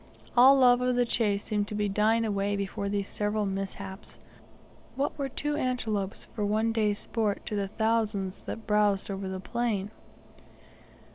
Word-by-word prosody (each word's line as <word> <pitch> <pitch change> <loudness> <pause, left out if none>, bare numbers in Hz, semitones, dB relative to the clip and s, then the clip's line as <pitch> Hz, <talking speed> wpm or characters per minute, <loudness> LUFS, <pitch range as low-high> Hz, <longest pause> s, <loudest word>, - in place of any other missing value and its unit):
All 260 +3 +8
love 250 -1 +5
of 250 0 +1
the 245 0 +3
chase 205 -4 +1
seemed 205 -1 -1
to 210 - -4
be 210 0 0
dying 215 +3 +2
away 200 -1 0
before 200 0 -3
these 200 -1 -1
several 210 0 -1
mishaps. 195 0 -5 0.8
What 275 +2 -1
were 275 -2 -3
two 295 +3 -2
antelopes 220 -8 -2
for 210 - -3
one 215 +2 +1
day's 210 -2 +1
sport 215 -3 -2
to 210 - -3
the 200 -1 -1
thousands 215 -3 -1
that 225 - -6
browsed 210 -2 +2
over 195 -1 -4
the 190 0 -4
plain? 210 -1 -2
210 Hz, 160 wpm, -28 LUFS, 200-230 Hz, 0.8 s, All